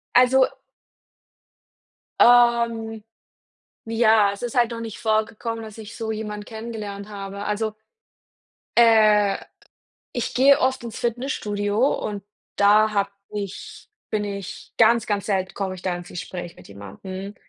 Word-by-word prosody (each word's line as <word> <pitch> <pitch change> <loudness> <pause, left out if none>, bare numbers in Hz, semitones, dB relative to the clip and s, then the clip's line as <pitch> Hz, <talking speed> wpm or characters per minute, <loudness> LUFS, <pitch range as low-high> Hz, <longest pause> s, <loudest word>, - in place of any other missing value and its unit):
Also 255 +1 +6 1.8
ähm, 235 -2 +4 0.8
ja, 225 -2 +4
es 200 - -11
ist 245 +1 -4
halt 240 -1 +3
noch 230 0 -5
nicht 225 -2 -7
vorgekommen, 225 +1 -1
dass 215 0 -10
ich 215 -1 -9
so 225 -1 -3
jemand 210 -1 -5
kennengelernt 220 -3 -7
habe. 200 -1 -7
Also, 215 +1 -1 1.0
äh, 215 -3 +5 0.8
ich 245 -1 -3
gehe 275 +2 +6
oft 260 -2 0
ins 230 -2 -6
Fitnessstudio 215 -4 -2 0.2
und 205 -2 -4 0.3
da 210 +2 +5
habe 200 -1 0 0.2
ich 200 -2 -7 0.2
bin 210 -1 -1
ich 200 -2 -7
ganz, 230 0 +4
ganz 205 -2 -1
selten 190 -3 -1
komme 190 -2 -3
ich 180 - -12
da 185 -2 -1
ins 175 0 -9
Gespräch 175 -1 -7
mit - - -15
jemandem. 185 - -8
215 Hz, 130 wpm, -23 LUFS, 200-230 Hz, 1.8 s, Also